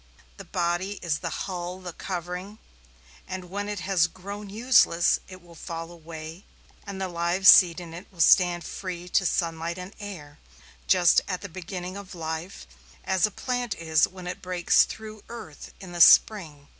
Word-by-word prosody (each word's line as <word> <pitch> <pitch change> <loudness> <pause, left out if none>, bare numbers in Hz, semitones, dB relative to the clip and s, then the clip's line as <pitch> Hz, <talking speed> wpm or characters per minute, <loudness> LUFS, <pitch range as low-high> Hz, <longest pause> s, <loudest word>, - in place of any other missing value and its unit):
The - - -10
body 180 +3 -1
is 155 -3 -1
the - - -4 0.2
hull, 180 -1 -5
the 180 -2 -8
covering, 180 +4 -6 0.7
and 185 -1 -7
when 205 +1 -3
it 205 -3 -4
has 185 -2 +2
grown 200 +4 -9
useless 215 -6 +3
it 185 -1 -12
will 170 -1 -16
fall 165 0 -7
away 165 +1 -10 0.4
and 200 -1 -6
the 190 - -2
live 175 +2 -2
seed 175 -2 +8
in 170 -2 -9
it 175 +3 -9
will 180 - -20
stand 175 +1 +5
free 180 -2 -6
to 190 0 +2
sunlight 165 0 -2
and 180 +3 -8
air 160 -8 -9 0.5
just 180 -2 +5
at 185 -2 -3
the 200 - -7
beginning 185 +1 -6
of 195 -2 -10
life, 160 +2 -5 0.4
as 190 +2 +2
a - - -7
plant 245 +1 -3
is 160 -2 +2
when 185 -1 -11
it 180 - -6
breaks 180 -1 +3
through 215 -1 -9
earth 220 -11 -10
in 190 -2 -10
the 175 -1 -2
spring. 155 -8 +5
180 Hz, 170 wpm, -26 LUFS, 170-195 Hz, 0.7 s, seed